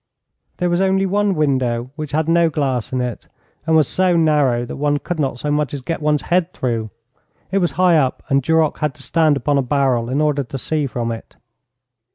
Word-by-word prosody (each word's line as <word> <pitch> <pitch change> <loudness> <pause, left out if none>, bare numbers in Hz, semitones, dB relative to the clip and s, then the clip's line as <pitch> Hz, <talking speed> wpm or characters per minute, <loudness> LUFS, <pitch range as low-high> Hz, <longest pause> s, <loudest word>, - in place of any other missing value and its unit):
There 180 -1 0
was 175 +2 +1
only 190 0 +2
one 200 0 +1
window, 130 -5 0
which 155 -2 -5
had 155 +1 0
no 170 0 +3
glass 135 -6 -2
in 130 -1 -1
it, 125 -2 -5 0.4
and 160 - +3
was 155 -4 +4
so 185 -2 +1
narrow 145 -7 +2
that - - -7
one 145 +1 +1
could 170 +3 -5
not 135 -4 -1
so 145 +4 -3
much 145 -2 0
as 140 - -6
get 165 +4 -4
one's 150 -1 +1
head 180 0 0
through. 115 -4 -2 0.6
It 195 - +2
was 175 -2 0
high 180 -2 +4
up, 135 -4 0
and 140 0 +2
Duroc 160 +2 +1
had 150 -4 -1
to 135 - -9
stand 155 +1 +2
upon 140 +2 +1
a - - +3
barrel 130 -3 0
in 135 +3 0
order 150 -2 +1
to 135 +2 -7
see 150 +2 -1
from 120 -2 -3
it. 115 - -8
150 Hz, 215 wpm, -19 LUFS, 130-165 Hz, 0.6 s, was